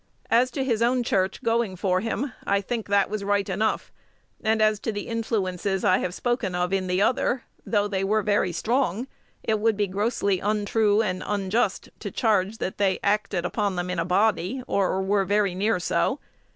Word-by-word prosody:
As 240 Hz, +3 st, +4 dB
to 265 Hz, +2 st, -2 dB
his 235 Hz, -4 st, 0 dB
own 245 Hz, +1 st, +2 dB
church 190 Hz, -4 st, 0 dB
going 230 Hz, -4 st, +1 dB
for 185 Hz, 0 st, +1 dB
him, 230 Hz, +6 st, -3 dB
I 200 Hz, 0 st, +2 dB
think 225 Hz, +3 st, -4 dB
that 200 Hz, -1 st, +3 dB
was 210 Hz, -1 st, -4 dB
right 205 Hz, 0 st, +1 dB
enough: 210 Hz, +3 st, -1 dB, 0.5 s
and 220 Hz, 0 st, +2 dB
as 215 Hz, -1 st, +3 dB
to 225 Hz, -, -2 dB
the 205 Hz, -1 st, -5 dB
influences 200 Hz, -4 st, -1 dB
I 185 Hz, -, +4 dB
have 180 Hz, 0 st, -3 dB
spoken 240 Hz, -7 st, -1 dB
of 180 Hz, +1 st, 0 dB
in 190 Hz, -1 st, 0 dB
the 180 Hz, +2 st, +2 dB
other, 250 Hz, +2 st, +1 dB, 0.2 s
though 205 Hz, -2 st, +2 dB
they 195 Hz, -2 st, -1 dB
were 210 Hz, +2 st, +1 dB
very 205 Hz, -3 st, +1 dB
strong, 235 Hz, +3 st, 0 dB, 0.4 s
it 215 Hz, -1 st, 0 dB
would 220 Hz, -1 st, +2 dB
be 205 Hz, -, +2 dB
grossly 200 Hz, 0 st, 0 dB
untrue 210 Hz, +1 st, +2 dB
and 185 Hz, -3 st, -2 dB
unjust 205 Hz, +3 st, -1 dB
to -, -, -5 dB
charge 215 Hz, -2 st, +1 dB
that 190 Hz, -, -4 dB
they 195 Hz, -2 st, +2 dB
acted 200 Hz, -3 st, 0 dB
upon 200 Hz, +1 st, -1 dB
them 180 Hz, 0 st, -2 dB
in 180 Hz, -, -2 dB
a -, -, +2 dB
body, 205 Hz, +5 st, +1 dB
or 190 Hz, -1 st, 0 dB
were 195 Hz, +1 st, +2 dB
very 200 Hz, -1 st, +1 dB
near 200 Hz, +2 st, +1 dB
so. 85 Hz, -, 0 dB
205 Hz, 190 wpm, -25 LUFS, 190-225 Hz, 0.5 s, As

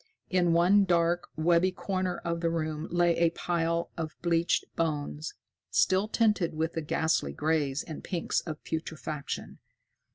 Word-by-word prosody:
In 175 Hz, -2 st, +3 dB
one 180 Hz, +4 st, +5 dB
dark, 175 Hz, -1 st, +2 dB
webby 170 Hz, +3 st, +3 dB
corner 185 Hz, 0 st, -2 dB
of 170 Hz, 0 st, -3 dB
the 170 Hz, -, +2 dB
room 155 Hz, -1 st, -2 dB
lay 175 Hz, 0 st, +3 dB
a 170 Hz, 0 st, +4 dB
pile 170 Hz, 0 st, -1 dB
of 160 Hz, -1 st, -4 dB
bleached 170 Hz, 0 st, +2 dB
bones, 155 Hz, -1 st, -2 dB, 0.3 s
still 190 Hz, +3 st, +3 dB
tinted 210 Hz, -7 st, +1 dB
with 160 Hz, +1 st, -1 dB
the 165 Hz, -, -2 dB
ghastly 155 Hz, -, 0 dB
grays 150 Hz, -, 0 dB
and 155 Hz, -, -8 dB
pinks 175 Hz, -3 st, -1 dB
of 155 Hz, -2 st, -7 dB
putrefaction. 155 Hz, -2 st, -5 dB
170 Hz, 140 wpm, -29 LUFS, 160-175 Hz, 0.3 s, one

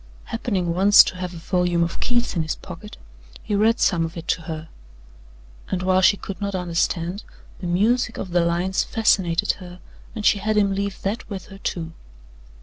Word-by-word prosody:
Happening 195 Hz, -7 st, -2 dB
once 195 Hz, +3 st, +8 dB
to 180 Hz, -, -5 dB
have 180 Hz, -1 st, -4 dB
a 175 Hz, -, -9 dB
volume 175 Hz, 0 st, +1 dB
of 170 Hz, -, -3 dB
Keats 240 Hz, -3 st, 0 dB
in 170 Hz, -, +1 dB
his 155 Hz, 0 st, -2 dB
pocket, 210 Hz, +6 st, -10 dB, 0.5 s
he -, -, -3 dB
read 220 Hz, +4 st, +3 dB
some 170 Hz, -3 st, +2 dB
of 165 Hz, +2 st, -5 dB
it 165 Hz, 0 st, -7 dB
to 165 Hz, -, +1 dB
her, 160 Hz, 0 st, -5 dB, 1.0 s
and 185 Hz, -1 st, -2 dB
while 185 Hz, 0 st, +3 dB
she 200 Hz, +2 st, +5 dB
could 195 Hz, +1 st, -7 dB
not 200 Hz, -1 st, -2 dB
understand, 175 Hz, +2 st, -1 dB, 0.4 s
the 180 Hz, -, -4 dB
music 220 Hz, +7 st, +1 dB
of 185 Hz, -, -5 dB
the 175 Hz, 0 st, +3 dB
lines 175 Hz, +3 st, +1 dB
fascinated 195 Hz, -5 st, +2 dB
her 180 Hz, 0 st, -10 dB, 0.4 s
and 210 Hz, -2 st, -4 dB
she 205 Hz, -, +4 dB
had 215 Hz, +1 st, 0 dB
him 200 Hz, -2 st, +3 dB
leave 200 Hz, 0 st, -3 dB
that 205 Hz, +5 st, -3 dB
with 195 Hz, -3 st, -6 dB
her, 195 Hz, 0 st, -11 dB
too. 165 Hz, -4 st, -4 dB
185 Hz, 190 wpm, -23 LUFS, 170-205 Hz, 1.0 s, once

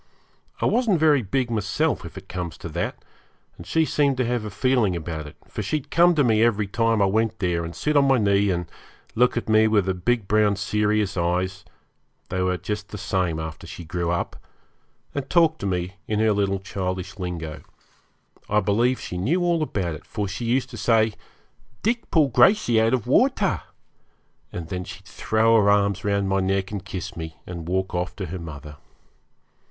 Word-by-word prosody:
I -, -, 0 dB
wasn't 225 Hz, -9 st, +2 dB
very 150 Hz, -3 st, +4 dB
big 120 Hz, +4 st, -1 dB
myself, 115 Hz, +9 st, 0 dB
if 85 Hz, -, -9 dB
it 95 Hz, 0 st, -10 dB
comes 90 Hz, -3 st, -5 dB
to -, -, -7 dB
that, -, -, -4 dB, 0.5 s
and 85 Hz, -, -12 dB
she 160 Hz, -1 st, +2 dB
seemed 140 Hz, -3 st, +1 dB
to 130 Hz, -, +1 dB
have 120 Hz, -1 st, -1 dB
a 105 Hz, -, -4 dB
feeling 110 Hz, -2 st, +1 dB
about 80 Hz, -2 st, -5 dB
it, -, -, -12 dB
for -, -, -5 dB
she'd 150 Hz, -2 st, -3 dB
come 175 Hz, +1 st, +5 dB
to 145 Hz, -, +4 dB
me 110 Hz, -3 st, +3 dB
every 110 Hz, -3 st, +3 dB
time 115 Hz, +1 st, +1 dB
I -, -, +5 dB
went 110 Hz, +3 st, +1 dB
there, 90 Hz, -4 st, 0 dB
and 85 Hz, +1 st, -6 dB
sit 150 Hz, 0 st, -1 dB
on 140 Hz, -1 st, +5 dB
my 135 Hz, -1 st, +4 dB
knee 100 Hz, -2 st, +3 dB
and 90 Hz, -1 st, -1 dB, 0.5 s
look 125 Hz, +1 st, +3 dB
at 120 Hz, -, -2 dB
me 110 Hz, 0 st, +5 dB
with 105 Hz, -3 st, +2 dB
her 95 Hz, -, 0 dB
big 100 Hz, +4 st, 0 dB
brown 105 Hz, -1 st, +3 dB
serious 105 Hz, 0 st, 0 dB
eyes 90 Hz, +2 st, -1 dB, 0.7 s
they 90 Hz, 0 st, -1 dB
were 90 Hz, 0 st, +1 dB
just 105 Hz, +3 st, -5 dB
the 105 Hz, -, -7 dB
same 90 Hz, -4 st, -1 dB
after 80 Hz, -1 st, -7 dB
she 85 Hz, -, -8 dB
grew 85 Hz, +1 st, -2 dB
up 85 Hz, 0 st, -2 dB, 0.8 s
and 140 Hz, -1 st, -4 dB
talk 165 Hz, -2 st, +3 dB
to 100 Hz, -, -3 dB
me 90 Hz, +1 st, -2 dB
in 105 Hz, -1 st, 0 dB
her 110 Hz, -1 st, +3 dB
little 100 Hz, -1 st, +1 dB
childish 95 Hz, 0 st, -4 dB
lingo. 80 Hz, -4 st, -5 dB, 0.9 s
I 105 Hz, -, +3 dB
believe 115 Hz, +6 st, +1 dB
she 90 Hz, -, -5 dB
knew 160 Hz, -, +1 dB
all 170 Hz, -2 st, +2 dB
about 95 Hz, -, -2 dB
it, 75 Hz, -, -10 dB
for 105 Hz, -2 st, -3 dB
she 100 Hz, +5 st, -5 dB
used 130 Hz, +3 st, 0 dB
to 120 Hz, -, -8 dB
say, 110 Hz, -1 st, +3 dB, 0.7 s
'Dick 230 Hz, +1 st, 0 dB
pull 155 Hz, -4 st, +3 dB
Gracey 120 Hz, -, +4 dB
out 115 Hz, +3 st, +3 dB
of 120 Hz, -, -4 dB
water;' -, -, +2 dB, 0.9 s
and 85 Hz, -2 st, -6 dB
then 90 Hz, -1 st, -3 dB
she'd 95 Hz, +2 st, -10 dB
throw 110 Hz, +3 st, +2 dB
her 100 Hz, -, +3 dB
arms 100 Hz, -1 st, +2 dB
round 100 Hz, -1 st, +1 dB
my 95 Hz, 0 st, +1 dB
neck 95 Hz, +1 st, 0 dB
and 100 Hz, -3 st, -4 dB
kiss 95 Hz, -3 st, -6 dB
me, 80 Hz, -1 st, -7 dB
and 85 Hz, -2 st, -7 dB
walk 95 Hz, +1 st, -1 dB
off 90 Hz, 0 st, -2 dB
to -, -, -4 dB
her 90 Hz, +3 st, -6 dB
mother. 75 Hz, -2 st, -9 dB
100 Hz, 200 wpm, -24 LUFS, 90-120 Hz, 0.9 s, come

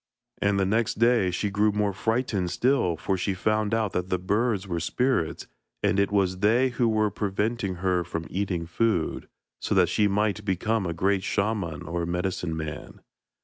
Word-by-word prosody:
And 100 Hz, -1 st, +2 dB
the 95 Hz, -, +2 dB
next 110 Hz, +3 st, 0 dB
day 115 Hz, -4 st, +3 dB
she 100 Hz, +3 st, -2 dB
grew 105 Hz, +2 st, +2 dB
more 105 Hz, -1 st, 0 dB
frightened 110 Hz, -3 st, -1 dB
still, 120 Hz, -8 st, +1 dB
for 95 Hz, +4 st, -1 dB
she 95 Hz, +1 st, -1 dB
found 110 Hz, +3 st, 0 dB
out 110 Hz, -3 st, 0 dB
that 90 Hz, +1 st, -2 dB
the 90 Hz, -, +1 dB
birds 100 Hz, +2 st, 0 dB
were 85 Hz, -2 st, -2 dB
spirits, 105 Hz, 0 st, 0 dB, 0.4 s
and 100 Hz, -, +2 dB
it 100 Hz, 0 st, +2 dB
was 95 Hz, -2 st, +1 dB
they 115 Hz, +6 st, +3 dB
who 120 Hz, -1 st, +1 dB
were 110 Hz, -1 st, +1 dB
preventing 105 Hz, 0 st, -1 dB
her 90 Hz, -1 st, 0 dB
from 85 Hz, -1 st, -5 dB
eating 95 Hz, -3 st, -2 dB
food, 85 Hz, 0 st, -1 dB, 0.3 s
so -, -, -1 dB
that 90 Hz, -3 st, +4 dB
she 105 Hz, +3 st, +2 dB
might 105 Hz, +1 st, 0 dB
become 100 Hz, +1 st, 0 dB
a 85 Hz, -, -2 dB
great 95 Hz, +2 st, +1 dB
shaman 100 Hz, -7 st, -1 dB
or 85 Hz, +1 st, -3 dB
medicine 90 Hz, -2 st, -2 dB
man. 80 Hz, -2 st, -7 dB
100 Hz, 180 wpm, -26 LUFS, 90-110 Hz, 0.4 s, that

